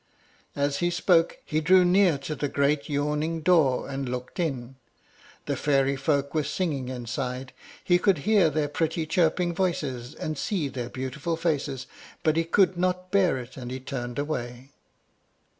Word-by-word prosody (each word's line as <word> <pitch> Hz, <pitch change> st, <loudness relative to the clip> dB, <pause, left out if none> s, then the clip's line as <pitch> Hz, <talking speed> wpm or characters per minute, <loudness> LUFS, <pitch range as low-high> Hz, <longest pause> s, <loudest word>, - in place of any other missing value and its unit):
As 140 Hz, 0 st, 0 dB
he 175 Hz, -, +2 dB
spoke, 175 Hz, -1 st, +2 dB
he 155 Hz, +1 st, 0 dB
drew 180 Hz, +3 st, +5 dB
near 180 Hz, -3 st, +4 dB
to 140 Hz, +3 st, -5 dB
the 145 Hz, -1 st, -2 dB
great 140 Hz, +2 st, 0 dB
yawning 150 Hz, +3 st, -1 dB
door, 155 Hz, -6 st, +3 dB
and 135 Hz, -2 st, -4 dB
looked 125 Hz, +7 st, -5 dB
in. 135 Hz, -6 st, -3 dB, 0.7 s
The -, -, -1 dB
fairy 140 Hz, -1 st, +2 dB
folk 140 Hz, 0 st, 0 dB
were 155 Hz, -1 st, +1 dB
singing 145 Hz, -4 st, -2 dB
inside; 125 Hz, +1 st, -4 dB, 0.3 s
he 175 Hz, -1 st, +3 dB
could 190 Hz, -1 st, +3 dB
hear 205 Hz, -6 st, +5 dB
their 150 Hz, 0 st, 0 dB
pretty 160 Hz, +2 st, -1 dB
chirping 170 Hz, +2 st, +1 dB
voices, 145 Hz, -9 st, -2 dB
and 155 Hz, -2 st, -4 dB
see 175 Hz, -9 st, -1 dB
their 125 Hz, -3 st, -5 dB
beautiful 140 Hz, +6 st, -3 dB
faces, 145 Hz, -5 st, -1 dB, 0.4 s
but 155 Hz, -2 st, +3 dB
he 165 Hz, 0 st, +1 dB
could 185 Hz, +1 st, +3 dB
not 185 Hz, 0 st, -1 dB
bear 190 Hz, -7 st, +3 dB
it, 125 Hz, +1 st, -9 dB
and 125 Hz, -2 st, -6 dB
he 130 Hz, +1 st, -4 dB
turned 125 Hz, -2 st, -5 dB
away. 130 Hz, -3 st, -4 dB
150 Hz, 160 wpm, -26 LUFS, 135-170 Hz, 0.7 s, drew